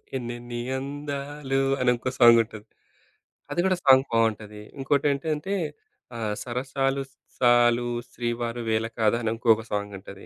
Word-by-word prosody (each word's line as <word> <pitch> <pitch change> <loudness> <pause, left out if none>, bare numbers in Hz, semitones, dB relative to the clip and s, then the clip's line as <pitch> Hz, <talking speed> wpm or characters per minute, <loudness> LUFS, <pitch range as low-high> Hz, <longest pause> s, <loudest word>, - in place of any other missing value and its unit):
ఎన్నెన్ని 120 -1 -5 0.2
అందాలు 140 0 -4 0.2
అనింకో 125 0 +1
సాంగ్ 120 -1 +8
ఉంటది. 110 -2 -12 0.9
అది - - -2
కూడా 185 -1 +2
సాంగ్ 135 0 +7
బావుంటది. 110 -2 0 0.2
ఇంకోటేంటంటే 145 +6 0 0.6
ఆహ్, 105 -2 -2
'సరసాలు 135 +2 -1 0.4
సాలు 120 -1 +4 0.2
శ్రీవారు 120 0 -3
వేల 110 0 +1
కాదాని' 115 +1 +2
ఇంకొక 115 -1 +3
సాంగ్ 105 0 -2
ఉంటది. 100 0 -12
120 Hz, 110 wpm, -25 LUFS, 115-135 Hz, 0.9 s, సాంగ్